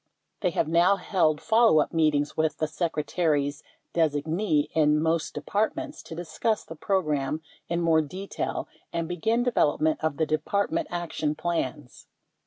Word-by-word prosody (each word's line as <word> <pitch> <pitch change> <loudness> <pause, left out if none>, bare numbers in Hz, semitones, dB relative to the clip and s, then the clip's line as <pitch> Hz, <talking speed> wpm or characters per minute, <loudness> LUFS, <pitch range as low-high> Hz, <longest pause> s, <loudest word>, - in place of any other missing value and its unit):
They 185 - +1
have 170 -3 0
now 170 +4 +4
held 170 -5 +1
follow 225 -7 +4
up 150 - 0
meetings 150 -3 +2
with 155 -2 0
the 155 - 0
Secretary's 155 -2 -1 0.3
designee 155 +1 +1
in 150 -1 +3
most 160 0 0
De - - -3
partments 295 +9 -2
to 160 - -8
discuss 190 +6 -1
the 165 - -9
program 155 -5 -1 0.3
in 170 0 0
more 165 -1 +4
detail 185 +7 -4 0.2
and 165 -1 -2
begin 220 +8 0
development 155 -10 +1
of 160 -3 0
the 160 - +2
Department 155 +7 0
Action 165 -3 -2
Plans. 145 -7 -3
160 Hz, 145 wpm, -26 LUFS, 150-180 Hz, 0.3 s, now